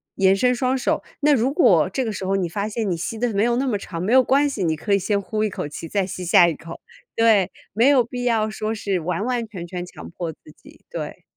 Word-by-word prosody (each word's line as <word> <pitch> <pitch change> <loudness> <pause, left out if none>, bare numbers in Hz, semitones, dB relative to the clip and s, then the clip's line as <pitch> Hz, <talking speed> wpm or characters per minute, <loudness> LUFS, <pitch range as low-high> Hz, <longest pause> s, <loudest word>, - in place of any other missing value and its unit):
延 195 0 +4
伸 250 +5 +2
双 255 +1 0
手。” 250 - -1 0.2
那 295 0 +4
如 260 +2 +1
果 180 - +4
这 260 +7 -2
个 220 - -2
时 195 -2 -5
候 195 +1 0
你 185 -3 0
发 200 +4 -3
现 215 -2 -2
你 175 - 0
吸 220 +7 -4
得 235 -1 -1
没 200 +2 +2
有 240 0 +2
那 270 +1 0
么 215 -5 0
长， 170 -4 -7
没 195 - -1
有 260 -1 +7
关 285 +3 +3
系， 210 -8 -3
你 160 -2 +1
可 200 +6 -2
以 200 - +4
先 200 +2 0
呼 215 +2 -2
一 215 - +1
口 150 - -5
气， 165 +2 -8
再 200 0 0
吸 185 -1 -6
下 175 0 +6
一 165 - -1
口， 165 0 -10 0.3
对， 215 -5 +3 0.2
没 230 +6 +3
有 270 -4 +5
必 245 +1 -6
要 225 -3 +1
说 215 0 -3
是 200 -4 -1
完 175 +4 -2
完 245 -2 -1
全 185 -5 -7
全 180 0 -5
强 - - -11
迫 170 -1 -4
自 - - -19 0.2
己， - - -19
对。 - - -6
210 Hz, 290 characters per minute, -22 LUFS, 180-240 Hz, 0.3 s, 有